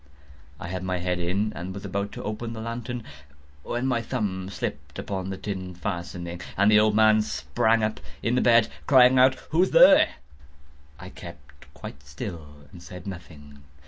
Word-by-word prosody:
I - - -6
had 90 0 -4
my 90 0 -2
head 90 0 -2
in, 95 +5 -1
and 95 +2 -6
was 100 - -7
about 100 +1 -3
to - - -7
open 110 +2 -4
the 115 - -7
lantern, 115 +1 -5 0.6
when 120 - -3
my 125 -3 +1
thumb 100 -6 -3
slipped 70 -7 -6
upon 95 -1 -4
the 95 - -4
tin 95 -3 -6
fastening, 85 -1 -5 0.2
and 100 +2 +4
the 105 - +7
old 105 0 +3
man 110 0 +5
sprang 115 +1 0
up 110 0 -1 0.2
in 125 +2 +1
bed, 115 -2 +5 0.2
crying 130 -2 +6
out—"Who's 130 +7 +3
there?" 275 +3 +6 0.8
I 90 +1 -9
kept 75 -7 -13
quite 70 - -9
still 75 0 -9
and 90 -3 -13
said 90 0 -10
nothing. 80 -6 -10
100 Hz, 165 wpm, -25 LUFS, 85-115 Hz, 0.8 s, the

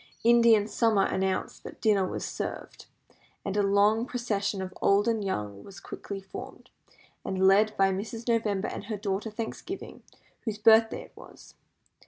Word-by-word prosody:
Indian 230 -2 +5
summer 215 -2 +2
announced 190 0 -2
that - - -10
dinner 200 -4 +2
was - - -4
served, - - -6 0.6
and 195 - -2
a 205 - +3
long 205 +4 +3
procession 205 -5 -2
of 185 -1 -5
old 200 +2 +3
and 225 -2 +1
young 105 - -4
was 195 -2 -12
quickly 200 -1 -7
formed, 195 0 -10 0.5
and 190 0 0
led 210 +2 +4
by 195 0 +4
Mrs. 225 +5 -5
November 220 -3 +1
and - - -6
her 215 0 -4
daughter 200 +1 -2
Thanksgiving, 230 - -7 0.4
whose 220 -3 -4
birthday 225 +1 +4
it - - -18
was. - - -15
205 Hz, 155 wpm, -28 LUFS, 195-225 Hz, 0.6 s, Indian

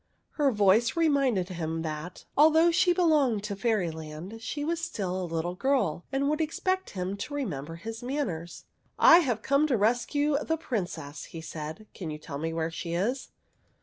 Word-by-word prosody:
Her 290 -3 +2
voice 210 - +3
reminded 275 - +2
him 165 -2 -3
that, 155 +3 -6
although 320 +3 +6
she 355 +2 +4
belonged 300 - +3
to 205 -1 -3
Fairyland, 180 -2 -3
she 290 +5 -3
was 335 +1 -1
still 190 - -3
a 180 - -4
little 165 +2 -1
girl 205 - 0
and 275 +1 +1
would 305 +2 +1
expect 370 +4 -1
him 185 +2 -2
to 290 +8 -5
re 285 -2 -1
member 150 - -5
his 225 +6 -7
manners. 245 - -4 0.2
" - - -40
I 335 - +8
have 245 -10 -1
come 280 +3 +3
to 260 -5 +2
rescue 245 +7 +2
the 320 - 0
Princess," 175 - -4
he 165 - -9
said. 160 +5 -7
" - - -45
Can 175 -5 -6
you 150 - -4
tell 140 -2 -7
me 165 +1 -2
where 165 0 -2
she 170 +1 -4
is?" 240 +9 -1
215 Hz, 185 wpm, -28 LUFS, -, 0.2 s, I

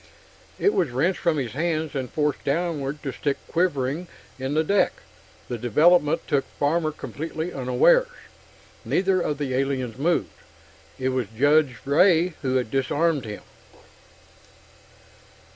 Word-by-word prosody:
It 410 - +2
was 170 -7 +1
wrenched 150 +10 0
from 170 -3 +1
his 125 -5 -2
hands 160 +1 -2
and 130 -3 -3
forced 150 -1 -1
downward 150 -2 -2
to 135 - -3
stick 140 -2 -1
quivering 165 -1 -1 0.3
in 130 +3 -2
the 155 - +3
deck. 200 +5 +2 0.5
The 120 - -4
development 150 +7 +3
took 140 -3 +1
Farmer 155 +2 +1
completely 160 +3 -5
unawares. 135 - +3 0.8
Neither 185 -1 +1
of 150 -4 -1
the 140 -3 -3
aliens 130 -2 -1
had - - -8
moved; 170 +3 +1 0.7
it 130 0 -1
was 130 -4 -1
Judge 145 -1 +3
Ray 165 +4 +4
who 130 -2 -1
had 125 -4 0
disarmed 145 +1 +1
him. 105 -1 -7
145 Hz, 135 wpm, -24 LUFS, 130-170 Hz, 0.8 s, Ray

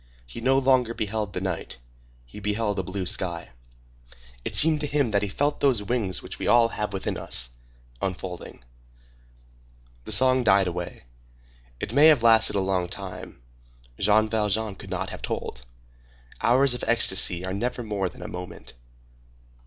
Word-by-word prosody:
He 90 - -9
no 130 +3 +3
longer 130 -3 +2
beheld 105 -1 -3
the 90 - -4
night; 95 -9 -4 0.5
he - - -12
beheld 105 0 -1
a - - +1
blue 95 +1 -5
sky. 85 -4 -2 0.9
It - - -5
seemed 155 -1 +5
to 150 - -2
him 140 -5 0
that 100 -1 +2
he 105 - -1
felt 145 +9 -1
those 125 -7 +2
wings 100 -4 -2
which - - -8
we - - -3
all 120 -1 +5
have 105 -2 -3
within 95 -1 -3
us, - - +1 0.5
unfolding. 90 -7 -6 1.4
The - - -7
song 130 0 +4
died 100 -3 +4
away. 90 -1 -5 0.8
It 110 - -5
may 145 +4 +7
have 150 -7 +5
lasted 110 -2 +5
a 100 - +1
long 95 -2 -1
time. 95 -10 -8 0.6
Jean 105 +2 +3
Valjean 110 -1 -1
could - - -12
not - - -4
have - - -8
told. 65 0 -5 0.7
Hours 130 +2 +3
of 125 - -6
ecstasy 95 -6 +4
are 95 - -4
never 120 +4 -3
more 100 -4 -2
than - - -12
a - - -6
moment. 90 0 -9
105 Hz, 160 wpm, -25 LUFS, 95-120 Hz, 1.4 s, may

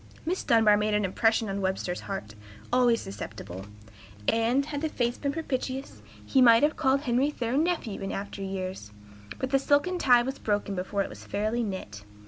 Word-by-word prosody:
Miss 360 +4 -1
Dunbar 220 -3 +5
made 210 0 +1
an 210 -1 +1
impression 225 +4 +2
on 195 0 -3
Webster's 190 -1 -2
heart, 195 - -6 0.4
always 245 -2 +4
susceptible, 95 -1 -7 0.6
and, 235 +5 +2
had 290 -1 -4
the 315 - 0
fates 240 -4 -1
been 280 - -1
propitious, 270 -3 -4 0.2
he 265 - +3
might 230 0 +7
have 300 +1 +3
called 275 -2 +2
Henry 255 +1 +1
Thoreau 245 -4 -2
nephew 315 - -1
in 195 - -3
after 200 0 -5
years; 185 - -5 0.5
but 260 - -3
the 270 - +4
silken 290 +7 +2
tie 245 -5 +5
was 265 +2 -4
broken 205 -1 -1
before 195 +2 -1
it - - -7
was - - -11
fairly 215 +4 -1
knit. 185 - -5
230 Hz, 180 wpm, -28 LUFS, 195-270 Hz, 0.6 s, might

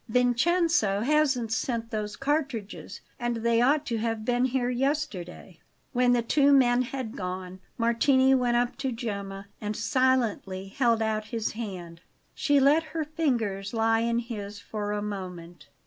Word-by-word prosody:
Vincenzo 250 - +2
hasn't 270 -4 +2
sent 230 -1 -2
those 210 -2 -3
cartridges, 275 -9 -3 0.2
and 240 0 -1
they 230 0 +2
ought 285 +4 +3
to 230 -4 -2
have 225 -1 -2
been 245 +1 +2
here 250 -1 0
yesterday." 245 - -3 0.3
When 245 0 +3
the 240 -1 +2
two 285 +4 +3
men 250 -3 +5
had 255 -2 -5
gone, 185 -1 -5 0.2
Martini 260 +3 +3
went 245 -2 +2
up 240 0 0
to 270 -1 -2
Gemma 200 -4 -5 0.2
and 210 0 -3
silently 230 -7 0
held 230 0 +2
out 215 -1 -1
his 225 -1 -3
hand. 180 -7 -7 0.3
She 290 -1 +2
let 285 +4 +5 0.2
her 315 - +1
fingers 235 - -1
lie 225 0 +3
in 230 0 0
his 210 -4 -5
for 205 +1 -5
a 210 0 -2
moment. 180 -5 -7
235 Hz, 150 wpm, -27 LUFS, 205-260 Hz, 0.3 s, men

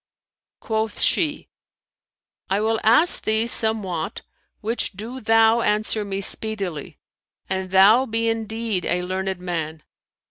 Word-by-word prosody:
Quoth 220 -1 -3
she, 305 -4 +1 1.0
"I 195 +2 +1
will 220 +1 0
ask 235 +11 +4
thee 220 +1 +1
somewhat, 215 -8 0 0.4
which 225 +1 -2
do 225 +7 -8
thou 225 +1 +4
answer 215 0 0
me 195 -1 -4
speedily, 195 -7 -1 0.5
an 190 0 -2
thou 205 +8 +5
be 230 0 -1
indeed 225 -3 -2
a 180 0 -1
learned 190 0 -3
man." 160 -3 -5
215 Hz, 115 wpm, -22 LUFS, 190-225 Hz, 1.0 s, thou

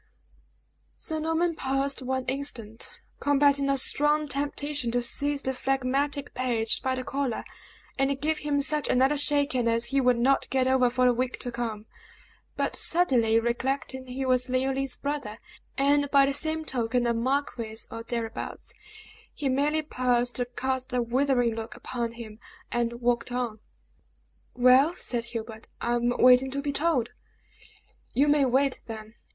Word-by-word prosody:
Sir 315 -1 -3
Norman 325 +2 0
paused 275 -1 -1
one 260 0 -2
instant, 235 -5 -4 0.2
combating 285 -1 +3
a 275 - +2
strong 295 +3 +2
temptation 285 -2 -1
to 245 0 +1
seize 285 +4 -1
the 265 - -1
phlegmatic 270 +2 -1
page 235 -3 0
by 260 0 0
the 255 - -4
collar, 270 -3 -2 0.6
and 270 0 +1
give 310 +1 0
him 290 -1 0
such 300 +1 0
another 265 +3 +3
shaking 285 -4 +3
as 230 0 +1
he 275 - +3
would 250 -1 +3
not 265 +3 +2
get 260 -1 +1
over 260 -1 +3
for 255 +1 +1
a 250 - +5
week 250 +1 -2
to 245 - -3
come; 225 -3 -4 0.7
but - - -1
suddenly 240 -10 +3
recollecting 260 +2 -2
he 260 +2 -4
was 255 0 +2
Leoline's 265 +1 0
brother, 280 -7 -4 0.4
and 285 +1 +3
by 275 -1 +5
the 275 - 0
same 315 +2 -1
token 245 -2 0
a 235 - +2
marquis 235 -2 -2
or 230 - -6
thereabouts, 230 -1 -5 0.6
he 285 -2 -3
merely 295 +4 +1
paused 245 -3 0
to 245 - 0
cast 260 +1 -3
a 250 -1 +1
withering 245 -1 +1
look 225 -1 -6
upon 235 -2 -4
him, 225 -2 -10 0.3
and 235 0 -1
walked 240 0 0
on. 240 -3 -2 1.0
"Well," 255 +6 +5
said 240 -8 -2
Hubert, 225 -1 -7
"I 240 - -1
am 240 0 +1
waiting 250 +2 +5
to 280 +1 -3
be 290 - -1
told." 280 -5 +1 1.1
"You 280 +3 +4
may 290 -1 +4
wait, 265 +1 +1
then!" 220 -1 -8
260 Hz, 155 wpm, -27 LUFS, 240-280 Hz, 1.1 s, a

